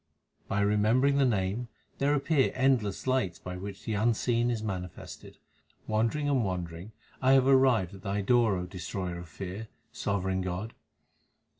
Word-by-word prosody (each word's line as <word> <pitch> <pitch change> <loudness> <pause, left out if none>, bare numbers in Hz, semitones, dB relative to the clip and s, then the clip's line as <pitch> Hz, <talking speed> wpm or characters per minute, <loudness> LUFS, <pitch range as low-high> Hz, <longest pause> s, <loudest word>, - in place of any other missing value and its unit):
By 100 - 0
remembering 110 +7 +3
the 140 - +4
Name 105 +2 -1 0.3
there 145 +1 +3
appear 145 -1 +2
endless 130 -7 +1
lights 130 -10 0
by 90 +2 -7
which 95 +1 -8
the 110 - -2
Unseen 115 +2 +1
is 115 -3 -2
manifested. 90 -4 -7 0.5
Wandering 115 +7 0
and 135 -4 +2
wandering 90 0 -4 0.3
I 130 +1 +5
have 135 -1 +5
arrived 130 -9 +4
at 95 - -11
Thy 100 +1 -2
door, 115 0 +3
O 90 - -3
Destroyer 90 0 -5
of 85 -2 -10
fear, 95 +7 -6 0.2
sovereign 95 -1 -1
God. 95 +5 -4
105 Hz, 150 wpm, -29 LUFS, 95-125 Hz, 0.5 s, I